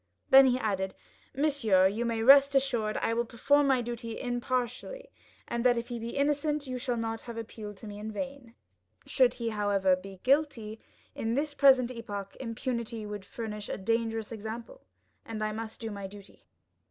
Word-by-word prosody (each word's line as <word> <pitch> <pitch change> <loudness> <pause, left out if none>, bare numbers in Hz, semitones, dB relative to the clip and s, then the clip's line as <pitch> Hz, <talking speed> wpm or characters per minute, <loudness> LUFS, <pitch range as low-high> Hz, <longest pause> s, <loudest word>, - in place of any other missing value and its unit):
Then 270 0 +9
he 250 0 +3
added, 195 -5 -2 0.4
"Monsieur, 260 -10 +3
you 220 +5 -2
may 230 -1 -1
rest 275 +2 +7
assured 235 -6 +1
I - - 0
shall 230 +1 +1
perform 280 +5 +2
my 260 -3 +3
duty 230 -1 -5
impartially, 250 - -3 0.4
and 235 0 -2
that 245 -1 +4
if 235 +1 -4
he 240 -1 -4
be 230 +3 -5
innocent 295 +1 +1
you 255 -1 -4
shall 245 -2 -2
not 225 0 -3
have 235 -2 -8
appealed 215 -2 -7
to 220 - -10
me 205 0 -8
in 215 +1 -5
vain; 270 0 -6 0.5
should - - +3
he, 235 -1 -2
however, 200 -3 +2
be 190 0 -11
guilty, 260 -6 +1 0.3
in 225 +1 -2
this 290 +2 -1
present 265 -3 +5
epoch, 205 -5 -6
impunity 235 -2 -4
would 210 -1 -6
furnish 210 -1 -6
a - - -3
dangerous 225 +2 -1
example, 230 - -7 0.4
and 220 -1 -5
I 215 - 0
must 220 +1 -6
do 225 -1 -5
my 200 -1 -5
duty." 200 0 -15
230 Hz, 175 wpm, -29 LUFS, 215-260 Hz, 0.5 s, Then